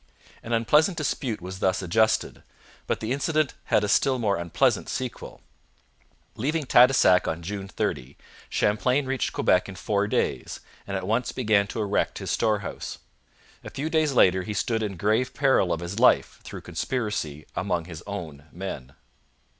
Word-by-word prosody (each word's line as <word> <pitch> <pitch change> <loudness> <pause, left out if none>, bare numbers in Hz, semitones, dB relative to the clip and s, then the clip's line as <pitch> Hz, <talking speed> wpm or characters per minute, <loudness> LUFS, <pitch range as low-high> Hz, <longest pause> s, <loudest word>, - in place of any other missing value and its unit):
An 115 - -8
unpleasant 150 - +3
dispute 130 - -2
was 95 +1 -7
thus 95 0 +1
adjusted, 110 +5 +1 0.5
but - - -1
the 110 +2 -3
incident 150 +1 0
had - - +2
a - - 0
still 130 +6 +3
more 105 -5 +1
unpleasant 85 -2 0
sequel. 130 -2 -5 0.9
Leaving 150 +7 -1
Tadoussac 125 -7 +5
on 80 +1 -3
June 100 +2 -5
30, 65 -7 -3 0.3
Champlain 125 +7 +1
reached 135 -2 -1
Quebec 90 +2 +2
in 100 - -8
four 100 +3 0
days, - - -1 0.3
and 100 -1 -2
at 95 - -5
once 115 +5 0
began 105 -5 +2
to 115 - -5
erect 105 -1 0
his - - -4
storehouse. 105 -3 -1 0.7
A - - -7
few 150 +4 -4
days 155 -3 +2
later 95 -6 +4
he 105 +3 -5
stood 115 0 0
in 100 -4 -3
grave 110 +7 0
peril 135 -10 +3
of 85 0 -1
his 90 +5 -5
life 125 - +3
through - - -8
conspiracy 105 - -3
among 90 -3 -1
his 85 -2 -9
own 80 -8 -7
men. 75 -8 -7
105 Hz, 160 wpm, -25 LUFS, 90-125 Hz, 0.9 s, Tadoussac